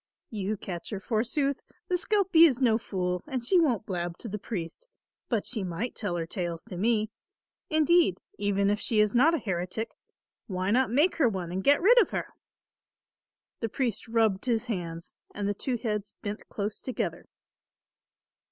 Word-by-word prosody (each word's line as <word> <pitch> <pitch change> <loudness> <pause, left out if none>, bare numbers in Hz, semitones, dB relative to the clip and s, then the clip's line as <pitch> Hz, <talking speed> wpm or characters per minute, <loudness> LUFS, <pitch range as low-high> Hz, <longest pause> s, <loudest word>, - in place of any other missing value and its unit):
"You 210 -1 -2
catch 175 -3 -6
her 205 - -4
forsooth! 250 +7 0 0.3
The - - -3
skelpie 360 -3 +5
is 260 -5 -1
no 235 -4 +3
fool, 180 -5 -2
and 260 -5 -3
she 365 +8 +5
won't 250 - +2
blab 175 -3 -3
to - - -6
the 210 0 -4
priest, 195 - -5 0.4
but 225 -5 0
she 215 - -2
might 185 +7 -3
tell 205 -5 -2
her 165 -1 -2
tales 170 -1 -4
to 185 - -6
me. 215 +2 +1 0.6
Indeed 315 - +4 0.2
even 200 0 +2
if 205 - 0
she 220 -2 +1
is 210 -1 +4
not 295 +8 +5
a - - +1
heretic, 190 - -3 0.6
why 185 0 -1
not 255 +3 +3
make 295 +10 +3
her 275 -7 +4
one 185 -5 -4
and 190 +2 -2
get 285 +4 +4
rid 480 +5 +8
of 405 - +1
her?" - - -3 1.3
The 230 - -2
priest 235 -3 -2
rubbed 225 -3 +2
his 235 -1 +1
hands 170 -7 -4 0.2
and 205 -1 -2
the 205 - +1
two 245 +4 -2
heads 210 -3 -3
bent 210 0 -5
close 205 0 -3
together. 255 - -3
215 Hz, 175 wpm, -28 LUFS, 190-255 Hz, 1.3 s, rid